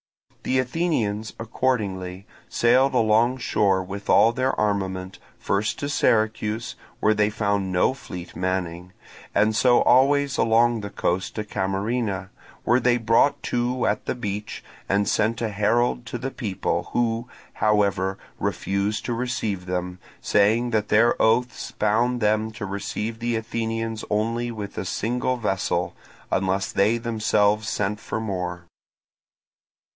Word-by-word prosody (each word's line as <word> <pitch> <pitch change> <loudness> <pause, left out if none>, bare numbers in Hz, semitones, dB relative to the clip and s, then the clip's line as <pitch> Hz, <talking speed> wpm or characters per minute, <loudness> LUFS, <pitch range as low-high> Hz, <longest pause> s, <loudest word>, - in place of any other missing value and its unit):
The 130 - 0
Athenians 125 -7 -1
accordingly 100 -6 -2 0.2
sailed 130 +3 +3
alongshore 110 -4 +2
with 100 +2 -8
all 115 - +6
their 130 +2 0
armament, 95 -3 -2 0.2
first 100 +2 -1
to 140 - -3
Syracuse, 110 -3 0 0.2
where 110 - +3
they 105 0 +2
found 100 -3 -1
no 90 +7 +2
fleet 90 -9 -9
manning, 90 -1 -3 0.4
and 110 +2 +3
so 120 +1 +4
always 140 +2 +3
along 115 0 +3
the 100 - -5
coast 95 -1 -2
to 110 - -2
Camarina, 100 0 -2 0.3
where 120 +2 +3
they 120 -1 +3
brought 115 +5 +2
to 125 +1 -1
at - - 0
the - - -2
beach, 105 -3 -5 0.3
and 100 +1 +2
sent 110 +1 +1
a 110 - 0
herald 115 +4 +1
to 120 - -4
the 130 +3 -4
people, 105 -9 -2
who, 120 0 0 0.3
however, 100 -3 +1 0.2
refused 100 +1 -1
to 120 - -1
receive 115 -6 -2
them, 90 0 -3 0.2
saying 110 +4 +2
that 105 -2 0
their 115 +3 +4
oaths 115 +3 +1
bound 120 +4 +1
them 110 0 +1
to 110 -2 -5
receive 105 +3 -4
the 120 0 -1
Athenians 115 0 -3
only 115 +3 0
with 105 -3 -7
a - - -4
single 125 +3 -1
vessel, 95 -5 -1 0.4
unless 95 +1 0
they 105 +4 +2
themselves 110 -2 +1
sent 105 +1 -1
for 110 - -4
more. 90 -5 -4
110 Hz, 135 wpm, -24 LUFS, 100-120 Hz, 0.4 s, all